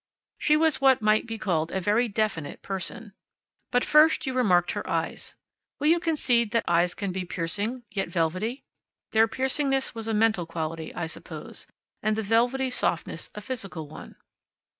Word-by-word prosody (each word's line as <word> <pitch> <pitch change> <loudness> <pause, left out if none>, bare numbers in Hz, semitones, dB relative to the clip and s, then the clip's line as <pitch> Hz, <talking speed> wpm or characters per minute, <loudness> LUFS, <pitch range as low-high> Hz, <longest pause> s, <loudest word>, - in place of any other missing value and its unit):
She 300 0 +4
was 315 -3 +2
what 265 -4 +5
might 215 +2 +3
be 225 -1 -4
called 170 -6 -1
a 190 - -1
very 210 +6 +2
definite 200 -9 -2
person. 195 +3 -4 0.6
But 245 0 +2
first 305 +1 +5
you 265 - -2
remarked 180 -9 +3
her - - -5
eyes. - - -3 0.4
Will 295 +2 +2
you 340 +1 +5
concede 260 -9 +1
that 230 - +2
eyes 175 +1 +2
can 200 -2 -3
be 185 0 -3
piercing, 200 +8 -3
yet 195 -4 -2
velvety? 185 - -1 0.5
Their 220 0 +5
piercingness 270 +2 0
was 225 -2 -5
a 225 - 0
mental 215 -6 +2
quality, 160 -1 -4
I 175 - -2
suppose, 160 - -8 0.3
and 215 0 +1
the 220 - -2
velvety 245 +5 +2
softness - - -1
a - - -6
physical 195 - -5
one. 150 - -11
220 Hz, 165 wpm, -26 LUFS, 180-255 Hz, 0.6 s, what